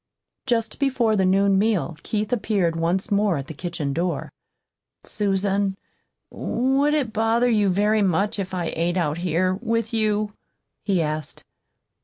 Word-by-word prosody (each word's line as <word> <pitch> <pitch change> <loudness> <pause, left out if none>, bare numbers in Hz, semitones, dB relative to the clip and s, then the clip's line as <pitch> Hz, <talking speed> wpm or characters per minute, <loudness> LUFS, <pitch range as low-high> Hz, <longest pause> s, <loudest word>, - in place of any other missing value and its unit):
Just 230 -3 0
before 255 -6 +2
the 190 -2 +2
noon 195 +1 +3
meal 205 -6 0
Keith 210 +1 -2
appeared 200 -7 0
once 170 +5 -1
more 200 -4 +2
at 135 - -4
the 160 - -8
kitchen 155 -3 -4
door. 175 +4 -2 0.7
"Susan, 195 -1 0 0.5
would 270 +4 +1
it 260 -8 -1
bother 225 +2 +2
you 210 -4 +3
very 210 +3 +2
much 200 +3 +1
if 190 -1 -3
I 175 -3 -2
ate 175 +2 0
out 160 -2 0
here 180 +1 +1
with 230 +2 -2
you?" 215 -1 0 0.5
he 190 -5 +1
asked. 155 -1 -4
200 Hz, 145 wpm, -23 LUFS, 175-220 Hz, 0.7 s, noon